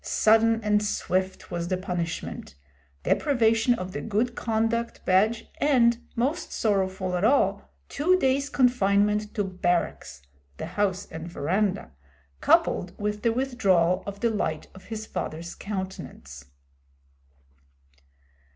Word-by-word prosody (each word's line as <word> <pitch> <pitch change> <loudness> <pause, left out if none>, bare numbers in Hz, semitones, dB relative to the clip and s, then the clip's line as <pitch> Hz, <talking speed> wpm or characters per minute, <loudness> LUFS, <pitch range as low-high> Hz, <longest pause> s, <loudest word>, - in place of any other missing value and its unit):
Sudden 225 +1 +3
and 210 0 +2
swift 190 -2 -2
was 170 0 -3
the 185 0 0
punishment 175 - -4 0.5
deprivation 240 -4 +2
of 185 -4 -6
the - - -5
good 225 +3 0
conduct 230 0 -1
badge 215 +5 +2
and, 240 -5 +4 0.2
most 275 +9 -1
sorrowful 190 -3 0
of 180 +1 -1
all, 260 +6 +2 0.2
two 355 +6 +2
days' 275 -3 +1
confinement 210 -5 +2
to 205 - +1
barracks 175 - -2 0.3
the - - -5
house 190 +2 -1
and 160 +1 -7
veranda 190 +4 -1 0.5
coupled 175 - +2
with 210 0 -2
the 230 - +2
withdrawal 195 -9 +2
of 200 0 -6
the 235 - +2
light 160 -7 -2
of 190 - -14
his 220 -1 -6
father's 170 -3 -5
countenance. 190 - -7
205 Hz, 120 wpm, -26 LUFS, 185-230 Hz, 0.5 s, and